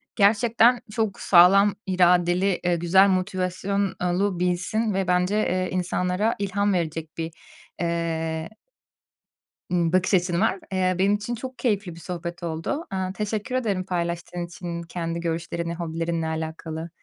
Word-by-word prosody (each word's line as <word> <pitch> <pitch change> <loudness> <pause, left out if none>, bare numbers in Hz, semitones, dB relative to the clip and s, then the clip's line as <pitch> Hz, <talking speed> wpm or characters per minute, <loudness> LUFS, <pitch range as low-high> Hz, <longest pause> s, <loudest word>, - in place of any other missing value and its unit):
Gerçekten 230 +3 +4
çok 220 -2 -1
sağlam 195 +3 +6
iradeli, 180 0 +3
ııı, 175 - +3
güzel 180 +4 +4
motivasyonlu 185 0 -1
birisin 180 +5 0
ve 190 -1 -1
bence, 180 +3 +2
eee, 185 -3 0
insanlara 180 +3 0
ilham 200 0 0
verecek 160 -2 -3
bir, 165 0 -3 0.5
eee 165 -1 -2 1.2
ımm, 170 -2 +1
bakış 185 +1 +2
açın 175 -1 +2
var. 205 -3 +1
Eee, 185 -1 +1
benim 200 +2 +4
için 215 +4 -4
çok 255 +2 -7
keyifli 205 -7 -1
bir 170 - -11
sohbet 175 0 -6
oldu. 170 - -3
Aaa, 185 -1 -2
teşekkür 210 +4 -3
ederim 210 -7 0
paylaştığın 175 -1 -3
için 170 0 -6
kendi 165 0 -4
görüşlerini 170 0 -3
hobilerinle 165 -1 -2
alakalı. 160 +1 -5
180 Hz, 130 wpm, -24 LUFS, 170-200 Hz, 1.2 s, sağlam